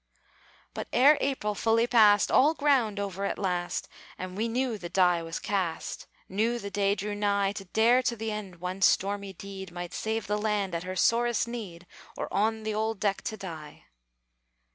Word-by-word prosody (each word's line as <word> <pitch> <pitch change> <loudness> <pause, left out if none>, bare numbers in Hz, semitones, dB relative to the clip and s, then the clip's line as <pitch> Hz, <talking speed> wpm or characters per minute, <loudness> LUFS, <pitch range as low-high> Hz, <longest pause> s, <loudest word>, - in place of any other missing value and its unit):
But - - -5
ere 280 +5 +6
April 260 -7 -1
fully 225 +2 +2
passed 215 -4 +5
All 300 +5 +5
ground 255 -9 +2
over 200 -1 -3
at 200 - -1
last 180 -3 -2 0.3
And 185 0 -6
we 220 +3 -1
knew 240 -1 -1
the 175 -1 -6
die 180 -2 +3
was 165 0 -5
cast, 185 -5 -3 0.2
Knew 225 +5 0
the 200 -3 -6
day 200 0 +1
drew 205 +1 -4
nigh 200 -1 +1
To 200 -1 -7
dare 230 +6 +4
to 245 -1 -1
the 225 0 -4
end 210 -4 -6
one 180 +2 -5
stormy 200 0 +2
deed, 190 0 -8
Might 175 0 -6
save 220 -1 -2
the 210 +1 -1
land 205 -3 0
at 170 - -2
her 185 +1 -5
sorest 235 +4 +2
need, 200 -8 -7 0.3
Or - - -3
on 220 +2 +1
the 215 0 -2
old 220 0 -1
deck 200 -1 0
to 220 - -3
die! 160 -6 -9
205 Hz, 185 wpm, -28 LUFS, 190-225 Hz, 0.3 s, ere